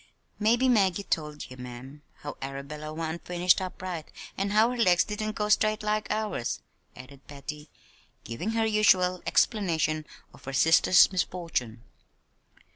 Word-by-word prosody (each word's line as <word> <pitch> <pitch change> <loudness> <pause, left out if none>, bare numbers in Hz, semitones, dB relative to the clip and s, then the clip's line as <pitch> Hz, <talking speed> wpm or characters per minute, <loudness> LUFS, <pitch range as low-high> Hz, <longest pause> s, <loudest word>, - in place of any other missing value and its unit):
"Mebbe 235 +4 +3
Maggie 200 -5 +2
told 150 -4 -3
ye, - - -8
ma'am, 125 +3 -10 0.2
how 145 -1 -6
Arabella 140 +3 -6
wa'n't 160 +1 -5
finished 180 +1 +2
up 185 0 -6
right, 175 -4 -5 0.2
an' 195 +1 -1
how 215 +4 +4
her - - -3
legs 180 -6 +4
didn't 215 0 -4
go 210 -1 -2
straight 215 +1 +2
like 215 0 -1
ours," 210 - -2 0.4
added 130 +2 -14
Patty, 150 +1 -8 0.5
giving 170 - -4
her 225 0 +1
usual 185 -4 +3
explanation 160 -8 +1 0.3
of - - -17
her 135 - -5
sister's 165 +6 +5
misfortune. 165 - -3
175 Hz, 140 wpm, -27 LUFS, 150-210 Hz, 0.5 s, sister's